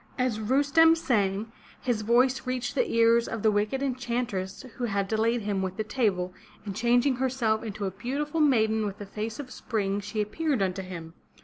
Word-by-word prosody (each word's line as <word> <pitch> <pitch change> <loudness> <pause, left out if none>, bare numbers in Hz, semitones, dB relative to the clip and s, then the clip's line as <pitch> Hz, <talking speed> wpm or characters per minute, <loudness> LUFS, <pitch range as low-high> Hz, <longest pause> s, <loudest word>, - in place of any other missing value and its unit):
As 250 -4 0
Rustem 285 +8 +4
sang, 210 -6 0 0.3
his 240 -4 -1
voice 250 +4 +2
reached 255 -1 -2
the - - +1
ears 230 0 +4
of 225 -2 -4
the 220 - +5
wicked 210 +6 0
enchantress 240 -6 -2
who 245 - -1
had 200 -3 -1
delayed 225 +3 +1
him 205 -2 -1
with 190 0 -3
the 215 - 0
table, 200 -6 0 0.3
and 200 -2 -5
changing 245 +4 +3
herself 245 -4 +1
into 215 -2 -4
a 190 - -2
beautiful 280 - -3
maiden 220 -7 +3
with 200 - -7
a 205 - -6
face 215 +4 -5
of 265 -3 -7
spring 200 -3 -2
she 205 +2 -5
appeared 255 +3 0
unto 190 0 -1
him. 170 -3 -8
225 Hz, 185 wpm, -27 LUFS, 205-255 Hz, 0.3 s, the